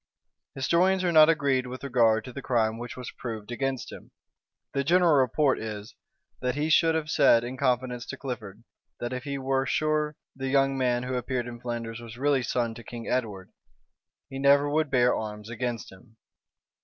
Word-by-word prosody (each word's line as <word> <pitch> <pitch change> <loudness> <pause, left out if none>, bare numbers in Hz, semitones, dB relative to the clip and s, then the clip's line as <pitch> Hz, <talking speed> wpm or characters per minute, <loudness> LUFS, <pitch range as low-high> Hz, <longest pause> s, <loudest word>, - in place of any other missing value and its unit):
Historians 180 +7 +2
are 175 - +2
not 155 -1 +7
agreed 140 -5 +1
with 130 +2 -8
regard 115 -5 +2
to 125 - -9
the 140 - -6
crime 115 -3 0
which 120 +1 -7
was 125 -3 -6
proved 110 -2 -7
against 135 0 -3
him. - - -11 0.6
The 140 - 0
general 175 +2 +4
report 135 +1 +3
is, 105 -1 -6 0.5
that 125 +1 -1
he 150 +2 -1
should 165 0 +4
have 155 -2 -2
said 115 0 +5
in 125 +2 -5
confidence 125 -2 -1
to - - -6
Clifford, 115 -5 -7 0.4
that 120 +1 -4
if 125 +2 -5
he 140 -1 -3
were 135 0 0
sure 155 -1 0 0.2
the 135 0 -4
young 135 0 +3
man 125 -2 +1
who 130 +1 -4
appeared 125 0 -2
in 120 -1 -8
Flanders 115 -2 -4
was 115 0 -10
really 140 0 +2
son 120 -1 -1
to 120 +1 -11
King 120 -1 -8
Edward, 105 -7 -2 0.8
he 135 -1 -7
never 140 +1 +5
would 155 +1 +1
bear 125 -2 +3
arms 105 0 -6
against 120 -2 -4
him. 110 +4 -18
125 Hz, 185 wpm, -27 LUFS, 120-140 Hz, 0.8 s, not